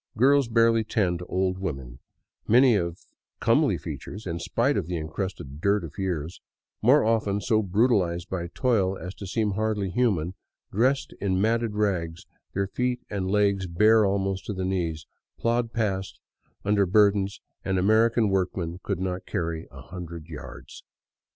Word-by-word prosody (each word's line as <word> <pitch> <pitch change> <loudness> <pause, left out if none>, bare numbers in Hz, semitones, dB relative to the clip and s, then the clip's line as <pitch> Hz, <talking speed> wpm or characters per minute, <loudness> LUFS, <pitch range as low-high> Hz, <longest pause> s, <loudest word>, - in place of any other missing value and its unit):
Girls 140 +2 +4
barely 115 -1 +3
ten, 95 -6 0
to 90 - -7
old 95 0 0
women, 65 -10 -5 0.5
many 125 +2 +6
of 85 -4 -1 0.4
comely - - +3
features 105 +5 -7
in 85 -2 -3
spite - - +1
of - - -1
the 90 -1 -2
encrusted 80 -3 -5
dirt 100 0 +2
of 80 +1 -9
years, 85 -4 -3 0.4
more 130 +7 +5
often 110 -3 +1
so 110 +1 +2
brutalized 95 -4 +1
by 85 -2 -3
toil 95 -2 +1
as 90 +1 -7
to 100 - -8
seem 105 +2 0
hardly 105 -2 -1
human, 95 -8 +1 0.4
dressed 130 +7 +1
in 95 -2 +1
matted 115 +1 +1
rags, 90 -6 -1 0.3
their 100 +1 +1
feet 125 +5 -2
and 95 -2 -2
legs 100 -2 +2
bare 105 +6 +5
almost 95 -1 0
to 105 - -2
the 95 -1 -3
knees, 85 -5 -2 0.3
plod 115 0 0
past 100 -5 -2 0.5
under 100 -1 +3
burdens 100 0 +3 0.2
an 95 0 0
American 110 +4 +3
workman 90 -2 -1
could 100 -4 -3
not 90 -1 -3
carry 80 -1 -3
a - - -12
hundred 85 -3 -8
yards. 80 -4 -10
95 Hz, 155 wpm, -26 LUFS, 90-110 Hz, 0.5 s, many